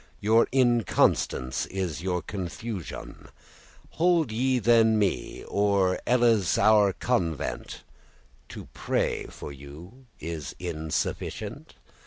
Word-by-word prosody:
Your 110 +3 +4
inconstance 120 - +2
is 90 -5 -3
your 90 -1 -2
confusioun. 95 0 -6 0.6
Hold 165 -6 +2
ye 130 +3 +1
then 115 -2 +4
me, 100 -3 -1
or 100 -2 +1
elles 115 -7 +3
our 105 -2 +5
convent, 85 - -2 0.7
To - - -8
praye - - -1
for - - -8
you 80 - -12
insufficient? 80 0 -4
100 Hz, 90 wpm, -27 LUFS, 85-120 Hz, 0.7 s, our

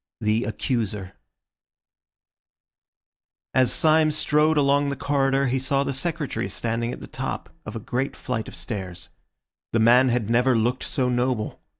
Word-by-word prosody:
THE 110 +2 +1
ACCUSER 105 -4 -2 2.4
As 130 -1 +3
Syme 155 0 +4
strode 155 +1 +2
along 140 0 +3
the 140 - -2
corridor 135 0 +1
he 130 0 0
saw 135 +1 +1
the 140 - -2
Secretary 145 -5 -2
standing 115 +1 -2
at - - -8
the - - -7
top - - -5 0.2
of 110 - -6
a - - -3
great 125 +5 -2
flight 115 -4 -4
of - - -8
stairs. 95 -6 -6 0.6
The 115 - +3
man 125 +3 +6
had 120 -3 0
never 125 +2 +3
looked 120 +3 0
so 130 -2 0
noble. 125 -3 -1
125 Hz, 150 wpm, -24 LUFS, 115-140 Hz, 2.4 s, man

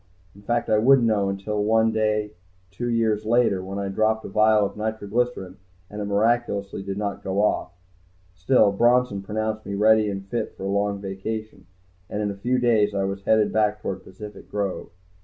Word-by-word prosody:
In 100 - -16
fact 120 +3 -1
I 110 - +3
wouldn't 130 +2 +5
know 100 -3 +1
until 105 +2 -2
one 110 +1 +3
day 105 -1 0 0.4
two 120 +5 -4
years 110 -2 +1
later, 110 -4 +2
when 95 +1 -6
I 100 0 -2
dropped 110 +2 0
a - - -6
vial 110 0 +4
of - - -5
nitroglycerine, 110 -2 -2 0.3
and 105 0 -6
it - - -2
miraculously 100 -1 0
did 95 0 -5
not 100 -1 -3
go 95 +2 0
off. 105 - 0 0.6
Still, 95 +4 +3
Bronson 120 -1 +2
pronounced 110 +2 -3
me 100 - -5
ready 110 +1 +4
and 95 -1 -5
fit 115 +1 -4
for - - -8
a 100 - -2
long 100 0 0
vacation, 100 +2 -6 0.4
and 105 - -4
in 105 - -1
a - - -7
few 120 +6 0
days 110 -4 +2
I 100 - 0
was 95 0 -3
headed 110 -1 +3
back 105 -1 +1
toward 95 -2 -5
Pacific 105 +2 -11
Grove. 100 -2 -3
105 Hz, 190 wpm, -24 LUFS, 100-110 Hz, 0.6 s, wouldn't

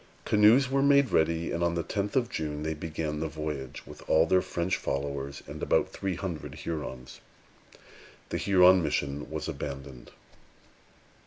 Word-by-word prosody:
Canoes 110 +6 +5
were 135 +1 +1
made 140 -2 +4
ready, 80 +1 +1
and 85 - -1
on 85 0 +1
the 85 - -1
tenth 100 +4 -3
of 125 -3 +2
June 75 -9 -4
they 80 0 -1
began 75 -1 -4
the 80 - -1
voyage, 75 -4 -6
with - - -12
all 80 +1 +5
their 95 +2 +3
French 90 0 -1
followers 70 0 -4
and - - -9
about - - +2
three 95 -2 -3
hundred 80 -6 -5
Hurons. 70 -5 -6 1.1
The - - -2
Huron 95 -1 +5
mission 75 -2 -2
was 80 0 -4
abandoned. 70 -4 -7
80 Hz, 155 wpm, -28 LUFS, 75-95 Hz, 1.1 s, Canoes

